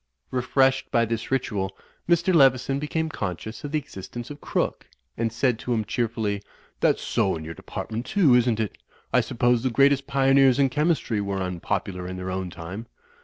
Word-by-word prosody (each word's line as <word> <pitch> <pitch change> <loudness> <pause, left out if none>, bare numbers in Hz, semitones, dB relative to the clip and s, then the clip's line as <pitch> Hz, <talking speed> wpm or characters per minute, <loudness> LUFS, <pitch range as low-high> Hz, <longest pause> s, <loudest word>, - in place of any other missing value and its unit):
Refreshed 130 +1 +2
by 115 0 +3
this 115 0 -3
ritual, 100 -7 -1 0.3
Mr. 175 +2 +3
Leveson 135 -2 +4
became 160 +2 -1
con 95 - -3
scious 110 +4 -9
of 145 - -5
the 155 - +1
existence 120 -1 -7
of 145 - -9
Crooke, - - -2 0.3
and 115 -1 -1
said 120 0 +1
to 125 - -2
him, 110 -1 -1
cheerfully, 110 -4 -1 0.4
"That's - - +2
so - - +1
in 80 - -6
your 80 - -6
department, 115 +7 -6
too, 180 -10 +4
isn't 120 -2 +3
it? 110 -4 -3 0.3
I - - +5
suppose 120 0 +1
the 130 - +1
greatest 135 +2 +3
pioneers 135 -1 +4
in 140 -1 +4
chemistry 150 -8 +1
were 100 -1 -2
un 90 -1 -4
popular 90 -1 -3
in 95 0 -5
their 90 0 -4
own 95 0 -3
time." 90 +7 -7
120 Hz, 185 wpm, -25 LUFS, 100-135 Hz, 0.4 s, I